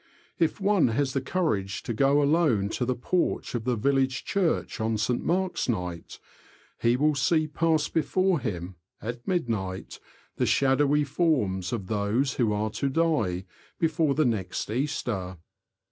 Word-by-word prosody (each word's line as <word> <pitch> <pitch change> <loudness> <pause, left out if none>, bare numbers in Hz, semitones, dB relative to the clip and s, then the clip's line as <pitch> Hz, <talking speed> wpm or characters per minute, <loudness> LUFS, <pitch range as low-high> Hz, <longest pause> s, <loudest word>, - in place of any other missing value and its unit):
If 165 +2 +1
one 200 -5 +3
has 130 +3 0
the 135 - 0
courage 120 - -1
to 120 - -3
go 140 +5 +3
alone 140 - +2
to 125 - -2
the 130 +1 0
porch 170 +9 -1
of 115 -2 -3
the 125 -1 +1
village 130 +2 +1
church 190 -5 0
on 110 0 0
St. 120 +3 0
Mark's 185 -4 0
night, 90 -6 -3 0.6
he 120 +1 +2
will 150 +3 +3
see 155 +3 +2
pass 155 0 +1
before 185 +2 +1
him, 90 -6 -5 0.2
at 120 +2 -6
midnight, 110 - -2 0.4
the - - +1
shadowy 140 +2 +3
forms 130 - 0
of 110 -5 -3
those 110 +7 0
who 115 -4 +2
are 105 +1 -1
to 140 +5 -1
die 130 - 0 0.3
before 160 -3 +1
the 155 - +3
next 105 -4 -2
Easter. 110 -8 -2
130 Hz, 150 wpm, -27 LUFS, 105-155 Hz, 0.6 s, one